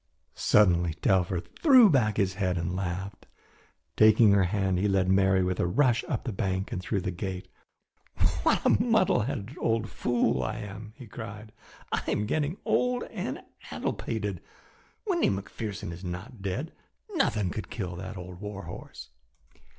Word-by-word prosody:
Suddenly 85 -5 +3
Telfer 90 -1 +1
threw 260 - +6
back 125 - +2
his 95 -2 +1
head 95 -2 -1
and 85 +2 -2
laughed. 95 +1 -4 0.7
Taking 110 0 +6
her 100 -2 +4
hand 95 0 0
he 100 - +2
led 95 -2 +2
Mary 95 0 +4
with 90 0 -1
a - - +2
rush 115 +4 +2
up 120 - -3
the 120 - -3
bank 95 0 -2
and 90 - -3
through 95 +1 -1
the 95 0 -2
gate. 95 +1 -5 0.9
"What - - +2
a - - +4
muddle 225 -5 +3
headed 120 +1 -3
old 115 -1 0
fool 120 -1 +1
I 95 - -2
am!" 105 0 -8
he 130 - -11
cried. 110 0 -8 0.4
"I - - 0
am 105 - 0
getting 155 - -1
old 250 0 +1
and - - -4 0.3
addle - - -2
pated! - - -4 0.6
Windy 365 -5 +2
McPherson 100 -1 -4
is 85 +3 -9
not 95 +6 -7
dead! 115 - -3 0.4
Nothing 105 - +1
could 110 - -5
kill 90 -5 -4
that 95 +3 -7
old 90 +1 -9
war 105 -1 -6
horse! 85 -5 -9
100 Hz, 160 wpm, -28 LUFS, 95-115 Hz, 0.9 s, threw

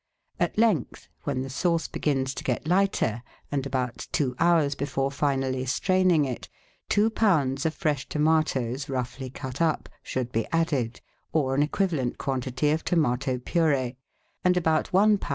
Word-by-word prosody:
At - - 0
length, 210 - +1 0.2
when 130 - -1
the 135 - -6
sauce 165 +4 0
begins 135 -3 -1
to - - -6
get 130 +4 -2
lighter, 180 - +2 0.3
and 140 -1 -1
about 125 -3 -3
two 130 -4 +1
hours 165 -4 +4
before 135 -1 -1
finally 135 -2 0
straining 180 +3 +3
it, 130 -3 -5 0.4
two 215 +2 +3
lbs. 155 -11 +2
of 160 - -3
fresh 145 -4 -1
tomatoes, 150 -4 +1
roughly 130 0 -3
cut 130 +2 -6
up, 160 -2 +1
should 125 -2 -3
be 115 - -1
added, 145 -8 0 0.3
or 135 -4 +2
an 140 - +2
equivalent 150 -5 0
quantity 130 +2 -1
of 160 +1 0
tomato 135 -5 +1
pur^e, 135 -3 +1 0.5
and 180 0 +3
about 160 -3 +1
one 205 +2 +5
lb. - - -6
140 Hz, 155 wpm, -26 LUFS, 130-165 Hz, 0.5 s, one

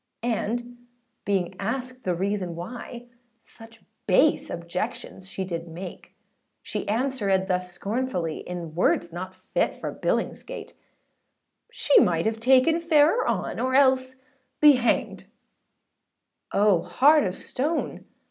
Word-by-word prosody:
And 240 +1 -2 0.5
being 190 -3 0
asked 255 +4 -4
the 180 -2 +1
reason 190 -1 -2
why, 235 +6 -8 0.3
Such 225 0 -16 0.2
base 265 +11 +3
objections 170 +2 -5
she 190 0 -4
did 170 -2 -5
make, 175 +2 -9 0.5
She - - -4
answerèd 210 -5 0
thus 180 -1 -2
scornfully, 200 -5 -2
In 175 -3 -7
words 170 0 +1
not 185 +2 -6
fit 185 - -2
for - - -5
Billingsgate: - - -3 1.0
âShe 290 - +4
might 165 -2 +1
have 220 0 -1
taken 265 +7 +4
fairer 330 +6 +4
onâ - - -1
Or 260 0 0
else 260 -1 +3 0.4
be 300 -1 +9
hanged:â 250 -3 0 1.3
Oh 200 -4 +3
heart 285 - +4
of 185 -1 -2
stone! 300 +6 -3
215 Hz, 120 wpm, -25 LUFS, 180-260 Hz, 1.3 s, be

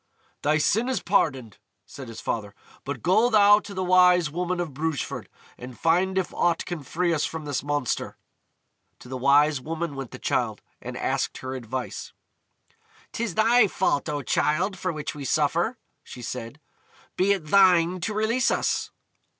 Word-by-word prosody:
"Thy 150 +1 +2
sin 220 +11 +1
is 255 -6 0
pardoned," 135 - 0 0.3
said 135 -2 -10
his 115 -1 -9
father; 105 -3 -4 0.3
"but 135 -3 -6
go 215 +8 +4
thou 205 -2 +6
to 210 - -11
the 185 -1 -3
Wise 180 -3 +4
Woman 180 +2 -2
of 170 -5 -3
Brugeford, 155 +1 -3 0.3
and 125 0 -9
find 180 +3 +2
if 190 - -1
aught 170 -1 +1
can 175 -3 -5
free 170 +5 -1
us 150 - 0
from 160 -2 -4
this 145 -3 -2
monster." 145 -3 -2 0.8
To - - -14
the 130 - -6
Wise 140 +2 +3
Woman 165 +1 -4
went 135 -3 -6
the - - -9
Childe, - - -1 0.2
and - - -7
asked - - -1
her 130 0 -6
advice. 130 0 -5 1.0
"'T 230 - -3
is 200 - -5
thy 225 +1 +5
fault, 170 -5 0
O 145 -1 -3
Childe, 175 +10 +1
for 185 -1 -2
which 150 -2 -5
we 145 - -8
suffer," 165 - +1 0.3
she 125 - -10
said; 120 +4 -6 0.6
"be 190 +2 +2
it 190 -6 -4
thine 180 -2 +5
to 205 +5 -3
release 230 +4 +1
us." - - 0
165 Hz, 170 wpm, -25 LUFS, 140-190 Hz, 1.0 s, thou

